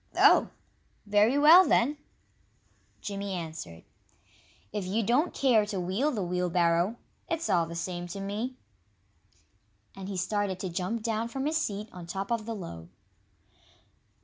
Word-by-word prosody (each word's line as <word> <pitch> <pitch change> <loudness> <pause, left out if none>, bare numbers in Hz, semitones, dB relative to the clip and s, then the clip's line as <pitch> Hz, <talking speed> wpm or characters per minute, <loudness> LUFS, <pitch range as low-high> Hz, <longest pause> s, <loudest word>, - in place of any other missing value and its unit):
"Oh, - - +6 0.6
very 210 +5 +3
well, 320 +6 +9
then!" 290 -3 +2 1.0
Jimmy 200 -1 -4
answered. 160 - -7 0.9
"If 205 - -2
you 200 +5 -1
don't 255 - +2
care 245 -6 +3
to 200 -2 -3
wheel 190 +11 0
the 220 -9 -2
wheelbarrow, 175 +2 +1 0.3
it's 330 - -1
all 170 -3 +3
the 170 - -7
same 175 +1 -4
to 185 +3 -7
me." 210 +6 -3 1.4
And 195 0 -7
he 195 - -4
started 195 0 -1
to 185 - -3
jump 190 +6 -3
down 225 0 -1
from 265 +3 -4
his 310 +2 +1
seat 210 -8 -3
on 175 -2 -10
top 195 +4 -4
of 230 -2 -1
the 230 - -3
load. 85 - -8
200 Hz, 145 wpm, -29 LUFS, 180-230 Hz, 1.4 s, well